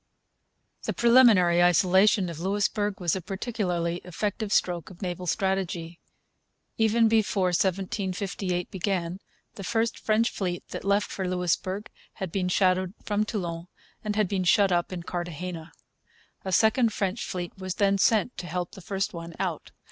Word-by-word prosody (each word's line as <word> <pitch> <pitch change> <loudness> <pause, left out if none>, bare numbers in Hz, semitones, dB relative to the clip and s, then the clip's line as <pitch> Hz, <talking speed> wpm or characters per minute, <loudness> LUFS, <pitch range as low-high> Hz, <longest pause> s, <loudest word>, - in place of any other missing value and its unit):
The - - -1
preliminary 225 -8 +5
isolation 190 +4 +4
of 165 -2 -6
Louisbourg 205 +2 0
was 175 -2 +1
a 190 - -3
particularly 180 -3 -2
effective 205 +4 -3
stroke 175 -4 +1
of 185 +1 -11
naval 180 0 -4
strategy. 175 -3 -1 0.8
Even 225 +1 +3
before 210 -4 +2
1758 185 0 -1
began 185 -2 -2 0.3
the 195 - -8
first 225 +3 0
French 220 +2 +2
fleet 180 -3 -3
that - - -6
left 200 +1 +1
for 190 -2 -3
Louisbourg 185 +3 -1 0.3
had 190 -5 -5
been 185 -1 -1
shadowed 185 +1 +2
from 210 0 +1
Toulon 175 -6 -4 0.4
and 210 -1 -2
had 210 -2 +2
been 190 0 -1
shut 195 +2 +4
up 175 0 +1
in 175 -2 -5
Cartagena. 175 -1 -5 0.7
A 190 - -3
second 220 +4 +4
French 200 +1 -2
fleet 175 -1 -5
was 185 -1 -4
then 200 -1 +2
sent 225 +4 +3
to 175 - -6
help 175 +1 -3
the 195 - -11
first 195 +1 -2
one 170 -1 -7
out. - - -3
190 Hz, 150 wpm, -27 LUFS, 175-205 Hz, 0.8 s, preliminary